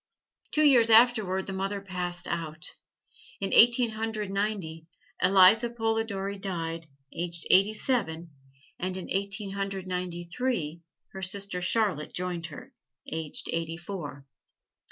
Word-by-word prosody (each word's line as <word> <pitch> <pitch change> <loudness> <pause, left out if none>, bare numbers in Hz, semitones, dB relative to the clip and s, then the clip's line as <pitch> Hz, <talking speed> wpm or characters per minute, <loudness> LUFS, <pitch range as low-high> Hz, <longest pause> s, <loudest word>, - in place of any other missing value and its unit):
Two 305 - +2
years 250 -6 +6
afterward 220 -5 +5
the 195 - -5
mother 195 +1 -2
passed 180 -2 -4
out; 165 0 -4 0.7
in 195 - -2
Eighteen 235 0 +6
Hundred 215 -2 -3
Ninety, 195 -6 -3 0.3
Eliza 195 +5 +6
Polidori 225 -4 -2
died, 165 -4 -4 0.3
aged 170 0 -4
eighty 195 +3 +5
seven; 170 -10 -2 0.5
and 185 +1 -3
in 185 - -7
Eighteen 200 +1 -1
Hundred 195 -1 -4
Ninety 180 -1 -4
three, 170 -5 -3 0.3
her 190 - -8
sister 190 0 -1
Charlotte 185 -5 +1
joined 175 -2 -3
her, 150 - -11 0.4
aged 160 -2 -4
eighty 165 0 -3
four. 170 -6 -7
190 Hz, 125 wpm, -28 LUFS, 170-215 Hz, 0.7 s, years